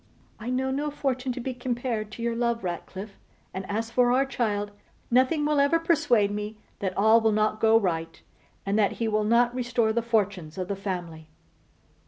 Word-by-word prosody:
'I 225 +3 -5
know 260 +1 0
no 290 +3 -1
fortune 265 -3 -2
to 250 - -6
be 255 +1 -3
compared 240 -3 -3
to 230 - -6
your 235 0 0
love, 235 -1 0
Ratcliffe; 190 +3 -6 0.3
and 190 0 -6
as 225 +2 -2
for 245 +1 +3
our 265 +2 +3
child, 205 -6 -1 0.4
nothing 260 +5 +3
will 300 -1 +2
ever 285 +4 +4
persuade 295 -11 +2
me 210 +1 -4 0.2
that 185 -3 -3
all 220 +3 +5
will 220 0 +3
not 215 0 +1
go 225 0 +5
right, 165 -5 -2 0.5
and 200 +2 +1
that 205 - +3
he 230 - -2
will 215 -1 +1
not 235 +3 +3
restore 240 -3 0
the 235 - +1
fortunes 205 -8 -1
of 185 0 -4
the 200 - -1
family. 175 -5 -5
225 Hz, 190 wpm, -26 LUFS, 205-250 Hz, 0.5 s, all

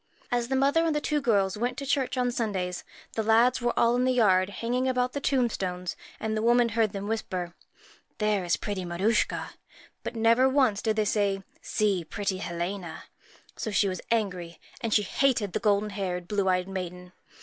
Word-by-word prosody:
As 240 -1 +1
the 265 - 0
mother 280 +5 +3
and 325 -2 +1
the - - +2
two 295 0 0
girls 200 -7 +2
went 245 +3 -1
to 275 - -4
church 265 -2 0
on 250 -1 +1
Sundays, 190 -7 -2 0.3
the 225 - 0
lads 230 +4 +4
were 240 0 +1
all 235 +1 +4
in 250 - +2
the 255 - +3
yard 190 -6 +4
hanging 245 +5 -1
about 250 -1 0
the 285 - -2
tombstones; 190 -10 -1 0.2
and 220 0 -2
the 215 - -1
old 230 - +1
woman 240 0 +4
heard 225 -2 +1
them 200 0 -5
whisper, 185 -5 -3 0.6
'There 210 -3 +1
is 175 -1 +1
pretty 200 -3 -4
Maruschka;' 185 +6 0 0.5
but - - -5
never 230 +3 +4
once 260 -7 +2
did 220 -1 0
they 215 -1 +1
say, 200 -2 0
' - - -33
See 205 -5 +2
pretty 195 +3 -3
Helena.' 175 0 -4 0.5
So 220 - -4
she 205 -1 +2
was 185 -2 -3
angry, 180 -7 -1 0.2
and 230 - -2
hated 210 -1 +2
the - - 0
golden 210 -1 +1
haired, 180 -3 -3
blue 200 -1 +1
eyed 180 0 +1
maiden. 180 -1 -6
215 Hz, 195 wpm, -27 LUFS, 190-245 Hz, 0.6 s, lads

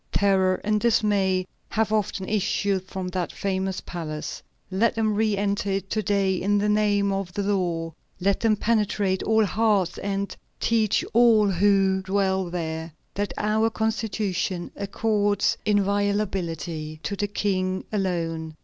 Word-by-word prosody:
Terror 190 -2 +3
and 210 0 +1
dismay 200 -5 +2 0.2
have 220 0 0
often 200 -3 -1
issued 200 -2 0
from 185 -1 -4
that 180 -1 -2
famous 190 -1 -2
palace. 155 -3 -5 0.3
Let 215 +5 +2
them 220 -1 +1
re 215 -1 +1
enter 200 0 0
it 195 0 -3
to 215 - +1
day 200 -1 +1
in 205 +3 +1
the 205 +1 +1
name 205 -1 +2
of 195 -2 -2
the 205 - -1
law, 175 -5 -1 0.3
let 195 +1 +1
them 225 -2 +3
penetrate 210 -3 +1
all 220 -1 +3
hearts, 205 -3 +1
and 200 0 -3 0.2
teach 220 -3 +2
all 220 -3 +5
who 195 0 +3
dwell 190 0 0
there, 160 -2 -4 0.2
that 205 0 -2
our 215 +2 +2
Constitution 210 -5 -2
accords 205 0 +1
inviolability 195 -6 -1
to 200 - -2
the 205 +1 -1
King 185 -2 -1
alone. 165 -5 -2
200 Hz, 140 wpm, -25 LUFS, 185-210 Hz, 0.3 s, all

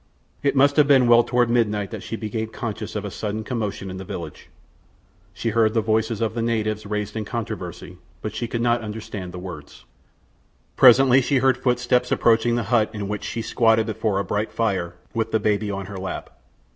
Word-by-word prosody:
It 140 - +1
must 140 +2 +4
have 150 -2 +6
been 135 -4 +5
well 120 0 +7
toward 120 0 +2
midnight 105 -4 0
that - - -6
she - - -5
became 110 0 -3
conscious 110 -1 -6
of - - -3
a - - -5
sudden 110 +1 -4
commotion 105 -5 -4
in 95 - -6
the 95 - -6
village. 85 -4 -8 0.8
She 115 - -3
heard 110 0 +2
the 115 - +3
voices 110 0 0
of 110 -2 0
the 115 - -2
natives 110 -2 -1
raised 105 0 -3
in 110 - -2
controversy, 90 -6 -6 0.2
but 110 - -4
she 120 - -3
could 115 0 -3
not 120 0 +2
understand 105 -4 -6
the 90 - -8
words. 85 -6 -9 0.9
Presently 130 +1 +7
she 135 +2 +1
heard 130 0 +3
footsteps 125 -1 +1
approaching 115 0 +3
the 120 - 0
hut 110 -3 +4
in 105 -2 -4
which 105 0 -4
she 115 - -4
squatted 110 -1 +3
before 110 -2 -1
a 100 - 0
bright 105 +2 -2
fire 95 -7 -1 0.2
with 115 -1 -1
the 110 - +2
baby 105 0 0
on 100 -1 -4
her 100 +1 -8
lap. 95 0 -6
110 Hz, 200 wpm, -23 LUFS, 105-120 Hz, 0.9 s, well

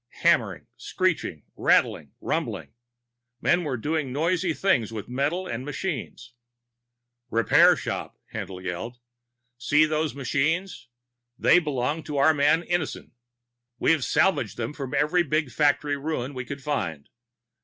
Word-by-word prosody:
Hammering, - - +2
screeching, 180 - -1
rattling, - - +2
rumbling. - - -3 0.7
Men 175 +6 +2
were 140 -5 -2
doing 150 +2 -2
noisy 170 +5 +1
things 135 - +1
with 110 -2 -6
metal 145 +9 -1
and 120 -5 -4
machines. 140 -5 -5 1.0
"Repair 115 0 +5
shop!" - - -5 0.2
Haendl 95 -4 -6
yelled. 95 +7 -5 0.6
"See 150 +5 +4
those 155 -1 -1
machines? 145 +2 -1 0.5
They 180 - +5
belong 150 -1 -2
to 150 -2 -4
our 140 +3 +5
man 150 +3 +3
Innison. 175 -3 -3 0.7
We've 155 +2 +2
salvaged 190 - +1
them - - -3
from 135 -4 -5
every 150 +5 +3
big 155 -4 0
factory 145 -1 +2
ruin 140 -2 -3
we 125 -1 -5
could 140 +1 -7
find. 85 - -3
145 Hz, 125 wpm, -25 LUFS, 125-160 Hz, 1.0 s, Repair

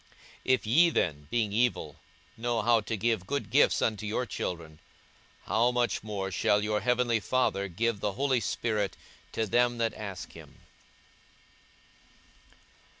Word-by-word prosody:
42:011:013 - - -30
If 130 -2 +2
ye 160 +11 +5
then, 75 - -1
being 110 -2 0
evil, 110 -10 0 0.4
know 120 0 -1
how 115 -1 +4
to 110 +1 -3
give 110 -3 0
good 140 +4 -3
gifts 145 - +4
unto 110 -1 -1
your 110 +4 -1
children: 80 -8 -5 0.6
how 115 +5 +2
much 125 -1 0
more 100 -3 -4
shall 105 +3 +2
your 105 0 0
heavenly 125 -2 +2
Father 105 -4 0
give 105 +4 -1
the 100 0 -1
Holy 130 +2 +1
Spirit 105 -1 -2 0.3
to 110 - -1
them 120 +3 +2
that 115 -2 0
ask 100 -4 -7
him? - - -14
110 Hz, 145 wpm, -29 LUFS, 100-120 Hz, 0.6 s, ye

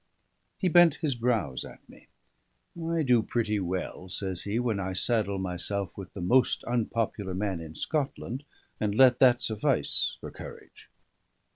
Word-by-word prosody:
He 190 - 0
bent 175 -2 +6
his 150 -4 -1
brows 115 - -1
at - - -13
me. - - -18 0.8
"I 165 -1 +1
do 125 -4 +4
pretty 110 -2 -1
well," 90 0 -4
says 95 -1 -2
he, 105 +2 -1
"when 120 -4 0
I 95 -1 -3
saddle 100 0 +1
myself 95 +1 -1
with 95 -2 -9
the 95 - -5
most 125 +9 +2
unpopular 115 -5 -2
man 95 -2 -2
in 80 -1 -9
Scotland, 135 - -3 0.4
and 105 -1 -1
let 125 0 +6
that 125 -2 +5
suffice 110 -2 +1
for - - -8
courage." - - -12
105 Hz, 150 wpm, -28 LUFS, 95-125 Hz, 0.8 s, bent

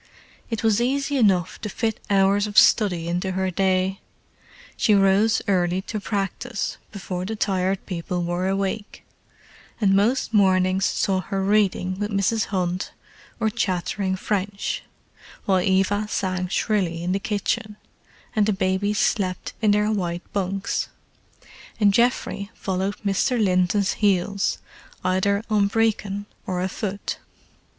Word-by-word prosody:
It 225 -2 -3
was 220 0 +3
easy 275 +3 0
enough 185 -6 +2
to 210 - -4
fit 220 +1 -2
hours 200 +1 +3
of 205 - -6
study 180 -7 +5
into 180 +2 -1
her 190 0 -1
day. 190 +1 +1 0.8
She 215 - +3
rose 200 +3 +3
early 185 -1 +1
to 215 +1 -4
practise, 205 +3 -3
before 185 -3 -5
the 220 +4 -3
Tired 190 -2 0
People 180 -1 -3
were 175 +2 -1
awake; 195 +2 -2 0.8
and 200 -3 +3
most 230 +5 +1
mornings 185 -2 +3
saw 190 -1 +1
her 195 +1 -3
reading 195 -2 +1
with 210 0 -1
Mrs. 205 +2 +1
Hunt 185 -1 -2 0.5
or 220 -1 +1
chattering 190 -2 -1
French, 200 +1 -2 0.6
while 190 -2 +3
Eva 195 +3 +1
sang 185 -2 -1
shrilly 180 -4 0
in 180 - -1
the 195 - +1
kitchen, 210 +1 -2 0.6
and 210 -1 +3
the 215 - +2
babies 190 +2 0
slept 185 -4 0
in 215 - +3
their 210 +1 +3
white 175 -4 -2
bunks; 195 0 -1 0.9
and 205 -2 +4
Geoffrey 235 -3 +1
followed 190 +1 -2
Mr. 205 +5 +1
Linton's 185 0 +2
heels, 200 -1 +1 0.5
either 190 +3 +1
on 210 -2 +3
Brecon 205 -2 0 0.2
or 180 -1 -1
afoot. 190 +2 -3
195 Hz, 130 wpm, -23 LUFS, 185-210 Hz, 0.9 s, study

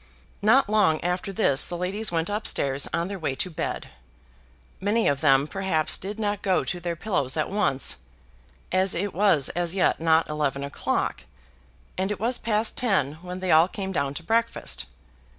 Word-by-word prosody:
Not 225 +6 +4
long 205 -7 +3
after 180 +2 -2
this 165 -9 +2
the 175 - -4
ladies 195 +4 -1
went 165 -1 0
up 210 +2 -1
stairs 140 0 0
on 170 +1 -1
their 195 0 -6
way 140 -5 -2
to 180 +7 -3
bed. 155 - -4 0.9
Many 210 +4 +1
of 140 -1 +1
them, 140 -1 +4
perhaps, 190 -4 0
did 205 +3 -6
not 205 -1 -1
go 190 -2 +1
to 175 - -3
their 170 0 -3
pillows 165 -8 0
at 155 - -1
once, 140 -11 +3 0.7
as 185 +1 +2
it 200 +3 -2
was 180 -8 +3
as 175 +1 -2
yet 190 - +2
not 160 0 +3
eleven 145 -2 -2
o'clock, 100 - -2 0.7
and 190 +1 0
it 210 - -3
was 235 +4 0
past 220 0 +1
ten 160 - 0
when 180 +1 -7
they 185 -2 0
all 160 +2 +6
came 190 0 -5
down 140 -5 -2
to 170 - -6
breakfast. 225 - -1
180 Hz, 180 wpm, -25 LUFS, 155-205 Hz, 0.9 s, all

